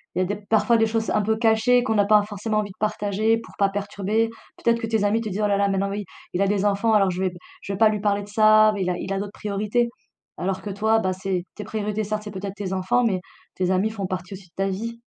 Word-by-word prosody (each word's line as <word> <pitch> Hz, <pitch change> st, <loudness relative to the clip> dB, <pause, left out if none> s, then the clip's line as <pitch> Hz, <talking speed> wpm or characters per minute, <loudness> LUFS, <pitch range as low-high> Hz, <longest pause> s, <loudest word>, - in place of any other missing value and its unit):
il -, -, 0 dB
y -, -, +3 dB
a -, -, +2 dB
des 205 Hz, +3 st, -2 dB
parfois 220 Hz, +3 st, +2 dB
des 225 Hz, 0 st, +3 dB
choses 225 Hz, 0 st, -1 dB
un 210 Hz, -, +2 dB
peu 220 Hz, +2 st, 0 dB
cachées 230 Hz, +2 st, +3 dB
qu'on 225 Hz, -3 st, 0 dB
n'a 205 Hz, -1 st, +4 dB
pas 210 Hz, 0 st, +5 dB
forcément 215 Hz, +1 st, -2 dB
envie 205 Hz, -1 st, -3 dB
de -, -, -15 dB
partager 215 Hz, +1 st, +1 dB
pour 230 Hz, -, -11 dB
pas 200 Hz, -1 st, +3 dB
perturber. 205 Hz, +2 st, -1 dB, 0.3 s
Peut-être 235 Hz, 0 st, +1 dB
que 225 Hz, -, -3 dB
tes 220 Hz, -2 st, +1 dB
amis 210 Hz, +3 st, +2 dB
te 220 Hz, -, -4 dB
dit: 200 Hz, +2 st, -3 dB
«Oh 210 Hz, -, +3 dB
là 200 Hz, -, +2 dB
là 200 Hz, 0 st, +2 dB
maintenant 195 Hz, 0 st, 0 dB
oui, 205 Hz, +1 st, -4 dB, 0.3 s
il 180 Hz, -, 0 dB
a 200 Hz, -, +3 dB
des 200 Hz, 0 st, +1 dB
enfants 205 Hz, +2 st, +2 dB
alors 195 Hz, -3 st, +4 dB
je 180 Hz, -, -4 dB
vais 190 Hz, -, +2 dB
b -, -, -14 dB, 0.3 s
je 200 Hz, -, -5 dB
vais -, -, -3 dB
pas 220 Hz, +1 st, +6 dB
lui 210 Hz, -1 st, -1 dB
parler 205 Hz, -1 st, +1 dB
de -, -, -11 dB
ça, 215 Hz, 0 st, +6 dB
beh 200 Hz, -, -3 dB
il 180 Hz, -, 0 dB
a 180 Hz, -, -1 dB
il 190 Hz, -, -5 dB
a 195 Hz, -, -1 dB
d'autres 200 Hz, 0 st, -5 dB
priorités». 210 Hz, +3 st, -1 dB, 0.5 s
Alors 190 Hz, +1 st, -2 dB
que 210 Hz, -, -6 dB
toi, 220 Hz, +3 st, +2 dB
bah, 185 Hz, -3 st, 0 dB
c'est 185 Hz, -1 st, -2 dB
tes 210 Hz, -, -6 dB
priorités 210 Hz, 0 st, -2 dB
certes 210 Hz, +1 st, -3 dB
c'est 210 Hz, -, -7 dB
peut-être 195 Hz, 0 st, -6 dB
tes 200 Hz, -3 st, -4 dB
enfants, 185 Hz, +6 st, +1 dB
mais 195 Hz, -5 st, +1 dB, 0.4 s
tes 185 Hz, 0 st, 0 dB
amis 190 Hz, +3 st, +2 dB
font 200 Hz, -4 st, -4 dB
partie 185 Hz, +1 st, -5 dB
aussi 185 Hz, -1 st, -11 dB
de -, -, -49 dB
ta 195 Hz, -, 0 dB
vie. 230 Hz, +5 st, -5 dB
205 Hz, 295 wpm, -24 LUFS, 195-220 Hz, 0.5 s, pas